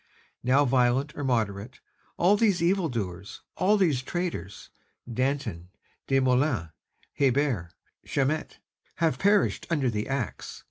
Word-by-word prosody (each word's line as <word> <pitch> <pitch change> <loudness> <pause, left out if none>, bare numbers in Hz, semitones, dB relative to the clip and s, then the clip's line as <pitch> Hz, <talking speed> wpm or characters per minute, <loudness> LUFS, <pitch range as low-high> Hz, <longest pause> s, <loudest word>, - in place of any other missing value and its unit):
"Now 135 +4 +3
violent 130 +3 +2
or 145 - -4
moderate, 115 -2 -1 0.4
all 190 +4 +4
these 205 -4 +2
evil 180 -1 +2
doers, 100 -5 -5
all 205 +3 +3
these 160 -10 +2
traitors, 165 - -5 0.4
Danton, 125 -8 -2 0.4
Desmoulins, 130 - +2 0.5
Hébert, 135 - +1 0.3
Chaumette, 145 +3 -1 0.4
have 160 -6 0
perished 200 +1 +2
under 140 -7 +1
the 105 -1 -3
axe. 135 - -4
135 Hz, 110 wpm, -27 LUFS, 120-160 Hz, 0.5 s, all